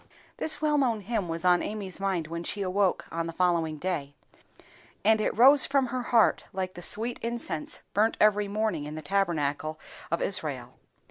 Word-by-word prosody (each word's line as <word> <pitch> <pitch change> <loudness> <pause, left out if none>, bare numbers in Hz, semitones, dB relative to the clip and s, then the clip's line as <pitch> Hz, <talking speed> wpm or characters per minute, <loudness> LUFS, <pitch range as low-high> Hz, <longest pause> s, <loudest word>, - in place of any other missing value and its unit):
THIS 310 -1 +2
well 300 -1 +2
known 235 -6 0
hymn 205 -2 -3
was 165 +2 -4
on 180 -1 +4
Amy's 200 -3 -6
mind 190 -4 -1
when 170 +2 -6
she 200 +4 -2
awoke 190 0 0
on 165 0 -3
the 165 - -6
following 170 -3 0
day, 150 -5 -4 0.9
and 220 0 +4
it - - -2
rose 270 +4 +8
from 275 -1 +1
her 255 - -1
heart 235 -2 +2
like 185 -1 -4
the 175 - -10
sweet 230 +6 0
incense 230 -9 -3
burnt 215 +3 +1
every 210 -1 +3
morning 205 -7 -2
in 150 +1 -7
the 155 - -7
Tabernacle 155 -4 -1 0.3
of 170 - -1
Israel. 135 -10 -1
190 Hz, 180 wpm, -27 LUFS, 165-220 Hz, 0.9 s, rose